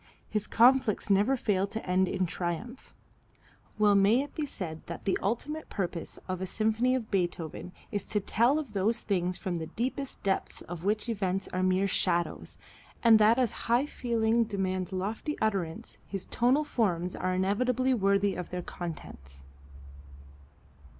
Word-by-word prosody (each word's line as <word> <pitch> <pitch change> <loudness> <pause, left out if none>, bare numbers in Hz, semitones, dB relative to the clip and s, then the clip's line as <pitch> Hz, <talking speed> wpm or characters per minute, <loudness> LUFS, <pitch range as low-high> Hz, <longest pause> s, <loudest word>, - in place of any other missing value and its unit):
His 210 -1 -2
conflicts 235 -3 +4
never 210 +8 +4
fail 200 -4 +1
to 220 +2 -6
end 185 +1 +3
in 185 0 0
triumph. 175 +9 -5 0.8
Well 210 -1 +5
may 200 +6 +4
it 290 - -10
be 305 -2 -2
said 165 - -6
that 170 - -7
the 195 - +2
ultimate 295 +9 -2
purpose 175 -4 -4
of 185 -1 -3
a 190 - -2
symphony 220 +6 +1
of 235 -4 -4
Beethoven 180 -2 -2 0.2
is 205 -2 -2
to 210 - 0
tell 235 +8 +2
of 285 -8 -5
those 215 +4 +1
things 180 -3 -1
from 180 -2 -3
the 160 -1 -4
deepest 260 - -4
depths 195 -1 -1
of 175 -1 -7
which 210 +3 0
events 195 -4 -1
are 185 - -2
mere 185 +1 +2
shadows, 175 -2 -1 0.5
and 225 -2 +7
that 215 +3 +5
as 250 -4 +2 0.2
high 240 +4 +4
feeling 235 -4 +1
demands 190 -4 -2
lofty 210 - -3
utterance 190 -7 -2
his 195 -2 -4
tonal 255 +5 +2
forms 180 - 0
are 185 0 -1
inevitably 250 +7 +1
worthy 200 -2 +2
of 180 - -5
their 180 0 -4
contents. 70 - -8
200 Hz, 155 wpm, -29 LUFS, 185-235 Hz, 0.8 s, and